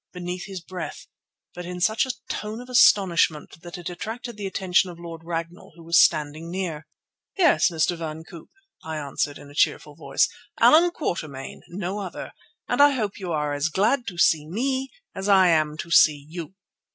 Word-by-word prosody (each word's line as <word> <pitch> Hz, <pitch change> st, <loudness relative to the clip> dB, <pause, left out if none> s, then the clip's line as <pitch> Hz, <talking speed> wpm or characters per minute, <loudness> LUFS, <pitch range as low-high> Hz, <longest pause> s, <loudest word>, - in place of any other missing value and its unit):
beneath 180 Hz, 0 st, -5 dB
his 190 Hz, -2 st, -7 dB
breath, 180 Hz, 0 st, -7 dB, 0.5 s
but 180 Hz, -, -7 dB
in 180 Hz, +1 st, -6 dB
such 220 Hz, +8 st, +2 dB
a -, -, 0 dB, 0.2 s
tone 215 Hz, +2 st, -4 dB
of 250 Hz, +1 st, -11 dB
astonishment 180 Hz, -10 st, +3 dB
that 175 Hz, +2 st, -9 dB
it 175 Hz, 0 st, -8 dB
attracted 225 Hz, +6 st, -6 dB
the 205 Hz, -2 st, -5 dB
attention 190 Hz, -1 st, +1 dB
of 175 Hz, -, -10 dB
Lord 165 Hz, -1 st, -8 dB
Ragnall, 165 Hz, +1 st, -6 dB
who 170 Hz, -, -14 dB
was 170 Hz, +1 st, +5 dB
standing 155 Hz, +1 st, 0 dB
near. 170 Hz, -4 st, -4 dB, 0.5 s
"Yes, 360 Hz, -, +4 dB
Mr. 170 Hz, +1 st, 0 dB
van 160 Hz, -1 st, -6 dB
Koop," 165 Hz, 0 st, -13 dB, 0.3 s
I 160 Hz, -1 st, -5 dB
answered 145 Hz, 0 st, -3 dB
in 145 Hz, -, -13 dB
a -, -, -14 dB
cheerful 145 Hz, -, +1 dB
voice, -, -, +1 dB, 0.3 s
"Allan 335 Hz, +3 st, +6 dB
Quatermain, 155 Hz, -, -5 dB
no 190 Hz, +2 st, -4 dB
other, 190 Hz, -3 st, -6 dB, 0.4 s
and -, -, +2 dB
I 290 Hz, 0 st, +7 dB
hope 215 Hz, -7 st, -3 dB
you 185 Hz, -3 st, -5 dB
are 150 Hz, -2 st, -1 dB
as 145 Hz, +3 st, 0 dB
glad 215 Hz, -, +1 dB
to 180 Hz, -3 st, -6 dB
see 155 Hz, -3 st, +3 dB
me 260 Hz, -, -2 dB, 0.2 s
as 195 Hz, +1 st, -4 dB
I 190 Hz, -2 st, +6 dB
am 155 Hz, -2 st, +2 dB
to 170 Hz, -, -7 dB
see 145 Hz, -3 st, +5 dB
you." 170 Hz, +2 st, -8 dB
175 Hz, 185 wpm, -24 LUFS, 160-200 Hz, 0.5 s, I